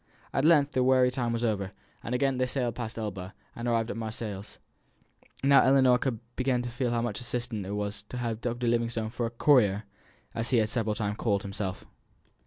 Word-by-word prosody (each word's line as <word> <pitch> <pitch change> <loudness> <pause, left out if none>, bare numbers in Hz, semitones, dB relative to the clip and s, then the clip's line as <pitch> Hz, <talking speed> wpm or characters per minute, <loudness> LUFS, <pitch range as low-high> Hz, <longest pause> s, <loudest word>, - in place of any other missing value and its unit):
At 135 - +1
length 150 -3 +5
the 130 -2 +2
weary 130 -1 +4
time 120 -2 -1
was 115 0 -1
over; 100 -4 -1 0.3
and 125 - -3
again 135 0 +1
they 130 - +2
sailed 125 -3 -1
past 115 -1 -5
Elba, 100 -3 -5 0.2
and 120 +1 -4
arrived 115 -1 +1
at - - -5
Marseilles. 110 -3 -5 0.9
Now 140 0 +7
Ellinor 130 -2 +5 0.4
began 130 -1 +1
to 120 - -5
feel 125 +1 -1
how 120 0 0
much 115 -3 -2
assistance 120 -4 -3
it 100 - -3
was 105 0 -3
to 125 - -5
her 120 -1 -1
to 115 +3 -3
have 120 - -4
Dr. 125 - -3
Livingstone 115 -1 0
for 120 0 -2
a - - -4
"courier," 115 -5 +3 0.5
as 115 +1 -2
he 125 - +3
had 110 -1 +2
several 110 -3 0
times 105 0 -2
called 100 -4 0
himself. 100 -2 -4
115 Hz, 205 wpm, -28 LUFS, 110-125 Hz, 0.9 s, Now